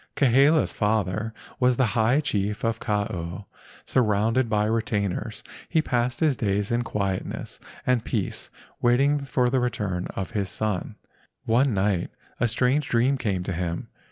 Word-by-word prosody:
Kahele's 140 +4 +4
father 105 0 0 0.3
was 125 -1 +3
the 130 - +4
high 115 +5 +2
chief 105 -6 -1
of 115 0 0
Kau. 100 -3 -3 0.4
Surrounded 115 +1 +2
by 105 -1 +2
retainers, 105 -1 -1 0.3
he 165 - +2
passed 125 -3 0
his 155 -4 +3
days 100 -2 -1
in 120 +1 +2
quietness 100 -5 -3 0.3
and 125 -3 +2
peace 110 -6 -3 0.3
waiting 135 +4 +3
for 130 -2 0
the 130 +1 +2
return 105 -7 -2
of 95 +2 -4
his 100 -4 -1
son. 105 -3 -2 0.5
One 120 +1 +3
night 95 -2 +1 0.3
a 120 - +3
strange 130 +5 +1
dream 125 +4 +3
came 100 -8 -1
to 95 - -3
him. 85 0 -3
115 Hz, 145 wpm, -25 LUFS, 100-125 Hz, 0.5 s, Kahele's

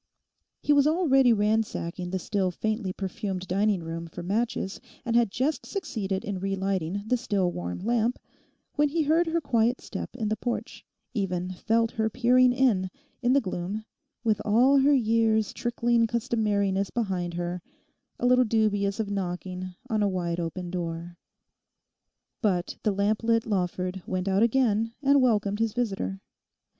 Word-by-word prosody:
He 295 - +4
was 285 0 +5
already 275 -6 +4
ransacking 210 -5 0
the 190 - -1
still 190 0 0
faintly 215 +2 -2
perfumed 190 0 -4
dining 200 -1 +1
room 165 +1 -5
for 170 +2 -8
matches, 205 +1 -2 0.2
and 235 -1 0
had 235 -2 +4
just 265 +9 -1
succeeded 200 - -3
in 195 -2 -3
relighting 195 -1 -1
the 250 +3 +1
still 200 -7 0
warm 90 - -4
lamp, 235 +4 0 0.6
when 295 -1 +2
he 320 +2 +1
heard 325 +3 +3
her 330 +1 +1
quiet 240 -4 +1
step - - -7
in 220 -4 -2
the 215 - +1
porch, 240 +3 -4 0.3
even 185 -4 -2
felt 225 +4 +1
her 220 0 0
peering 250 +2 +4
in, 240 -8 +2 0.3
in 245 0 +3
the 280 - +5
gloom, 195 +1 -4 0.4
with 215 -3 +1
all 250 +6 +5
her 280 +2 +5
years' 225 -3 +2
trickling 235 -1 +1
customariness 205 -4 0
behind 185 -7 -2
her, 175 +1 -3 0.6
a - - -1
little 250 0 +5
dubious 210 -3 +1
of 210 -2 -2
knocking 185 -1 -4
on 220 -4 0
a 205 - +3
wide 175 -2 -2
open 175 +1 -4
door. 170 0 -5 1.2
But 185 -6 0
the 215 - +1
lamp 200 +2 +1
lit 230 0 +2
Lawford 185 -2 -2
went 185 0 -2
out 195 +1 +2
again 230 -2 +2
and 280 0 +5
welcomed 210 -4 +2
his 225 -2 0
visitor. 195 -5 -2
210 Hz, 155 wpm, -27 LUFS, 185-235 Hz, 1.2 s, was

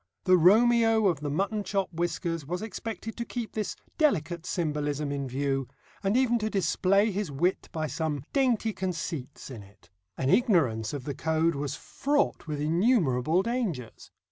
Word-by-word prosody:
The 185 - +5
Romeo 225 +4 +5
of 175 -7 +2
the 150 0 -3
mutton 200 +7 -1
chop 195 -1 -2
whiskers 170 -1 -2
was 180 +7 -4
expected 225 0 -6
to 235 - -2
keep 235 -1 -5
this 215 -2 -3 0.2
delicate 175 - +1
symbolism 150 -3 -1
in 140 -1 -3
view, 135 0 -1 0.3
and 200 +4 +1
even 240 -2 +3
to 215 0 -1
display 195 +3 +2
his 195 -4 -3
wit 175 +7 0
by 155 -1 -2
some 150 -1 -2
dainty 245 -5 +2
conceits 165 -8 -5
in 115 -5 -8
it. 100 -3 -19 0.3
An 135 +1 +1
ignorance 140 - +2
of 140 -3 -4
the 145 - -4
code 160 +3 +1
was 140 -1 -3
fraught 285 - -1
with 150 -2 -3
innumerable 165 - +2
dangers. 210 - -3
175 Hz, 160 wpm, -28 LUFS, 145-215 Hz, 0.3 s, The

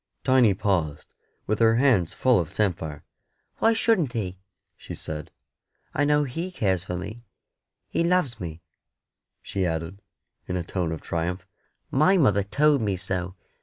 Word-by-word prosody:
Tiny 125 -6 +4
paused, 85 -7 -1 0.3
with 110 - -1
her 115 -1 +5
hands 115 - +3
full 125 -4 +3
of 85 -3 -2
samphire. 80 -8 -1 0.5
"Why 225 - +4
shouldn't 205 - +2
He?" 95 -5 -3 0.4
she - - -9
said. 75 -1 -5 0.6
"I 145 - +2
know 150 0 +3
He 165 +7 -4
cares 95 - 0
for 90 -1 -4
me. 110 +6 -7 0.6
He - - 0
loves 170 -9 +1
me," 85 -3 -7 0.8
she 95 - -2
added, 85 +3 -3 0.5
in 90 - -2
a 90 - -2
tone 85 -1 -2
of 80 - -4
triumph; 90 +3 -3 0.5
"my 155 +8 +4
mother 105 - +4
told 140 +7 +2
me 100 -3 0
so. 90 -1 -3
100 Hz, 150 wpm, -25 LUFS, 90-130 Hz, 0.8 s, her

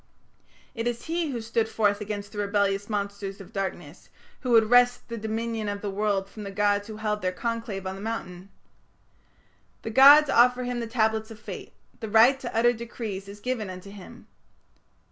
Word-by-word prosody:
It 230 -1 -3
is 240 -1 -3
he 330 -1 -1
who 240 -4 -4
stood 225 0 -1
forth 205 -2 +1
against 205 -1 -5
the 210 - -7
rebellious 200 0 0
monsters 200 -1 -4
of 195 - -12
darkness, 195 -1 -5 0.3
who 255 - -5
would 225 -2 +5
wrest 245 0 +4
the 235 - -4
dominion 220 0 -3
of 200 0 -4
the 205 - -3
world 200 -1 0
from 215 - -11
the 200 - -6
gods 205 0 +1
who 215 -1 -8
held 210 -1 -2
their 185 - 0
conclave 225 -1 -4
on 190 - -3
the 195 - -9
mountain. 195 -4 -6 1.3
The 225 - -4
gods 285 +5 +8
offer 250 -1 +4
him 245 0 -3
the 230 - -4
Tablets 220 -1 0
of 220 -1 -11
Fate; 220 - -9 0.3
the 220 - -5
right 235 +5 +5
to 245 -4 -6
utter 240 +1 +4
decrees 225 -4 -6
is 200 +1 -10
given 230 -3 -3
unto 185 +2 -9
him." 200 -2 -12
220 Hz, 185 wpm, -26 LUFS, 200-235 Hz, 1.3 s, gods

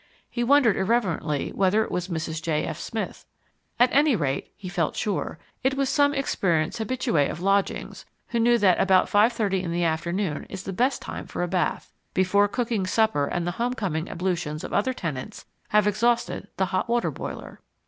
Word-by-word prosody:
He 240 - -1
wondered 255 -4 +4
irreverently 190 - 0
whether 200 +3 +3
it - - -7
was 180 0 -2
Mrs. 160 -2 -3
J. 160 -2 0
F. - - -4
Smith. - - -5 0.5
At 245 +1 +4
any 285 -1 +4
rate 140 -7 -2
(he 190 - -8
felt 175 -3 -1
sure), 205 -3 -2 0.3
it 265 +1 +2
was 275 -1 0
some 285 -1 +3
experienced 185 - 0
habitue 235 - -1
of 155 - -5
lodgings, 195 +2 0 0.3
who 235 - 0
knew 240 +1 +4
that 195 -5 +4
about 190 -1 +4
five 210 +4 +5
thirty 200 -5 0
in 175 -2 -4
the 175 +1 0
afternoon 170 +1 -1
is 190 -1 -6
the 195 - -5
best 250 +8 +1
time - - -6
for - - -3
a - - 0
bath 180 -2 -1 0.2
before 195 +2 +3
cooking 225 -3 -1
supper 205 -8 +2
and 175 +2 -2
the 175 - 0
homecoming 195 -10 -1
ablutions 175 -4 -2
of - - -6
other 235 +6 +2
tenants 165 - -5 0.2
have 210 0 +3
exhausted 230 0 +1
the 190 - +2
hot 185 +4 0
water 240 0 +1
boiler. - - -7
195 Hz, 185 wpm, -25 LUFS, 175-235 Hz, 0.5 s, five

